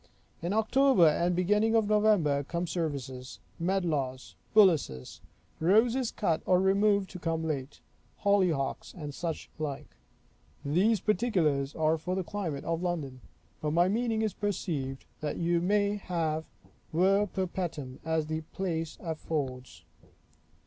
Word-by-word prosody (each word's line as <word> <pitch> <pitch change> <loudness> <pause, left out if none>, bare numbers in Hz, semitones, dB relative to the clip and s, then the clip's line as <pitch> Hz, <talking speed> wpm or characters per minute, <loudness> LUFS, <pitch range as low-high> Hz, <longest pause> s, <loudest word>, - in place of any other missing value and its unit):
In 170 +2 -2
October 220 -1 +4
and 165 +3 +2
the 180 +1 +1
beginning 210 +4 +2
of 220 -2 +3
November 210 -9 +3
come 170 +5 -3
services; 140 -7 -4 0.2
medlars; 160 -8 -1 0.2
bullaces; 155 - +3 0.4
roses 225 +8 +3
cut 165 -7 0
or 180 -1 +5
removed 200 +1 +3
to 180 - -8
come 165 -1 -1
late; 140 -3 -4 0.4
hollyhocks; 185 -9 +1
and 150 -5 -6
such 165 +1 -4
like. 150 -1 -3 0.8
These 190 +8 +2
particulars 170 - +1
are 160 0 +2
for 180 +4 -3
the 190 - -1
climate 165 -6 -4
of 165 0 -1
London; 150 -8 -3 0.4
but 150 -1 -1
my 175 +2 +4
meaning 225 +2 0
is 215 - 0
perceived, 150 -10 -3
that 150 -1 -3
you 170 0 +1
may 205 +2 +2
have 160 -5 -2 0.5
ver 195 +5 +3
perpetuum, 175 -8 -4
as 160 -1 0
the 155 +1 -3
place 165 -4 -3
affords. 145 -6 -4
170 Hz, 130 wpm, -29 LUFS, 150-200 Hz, 0.8 s, or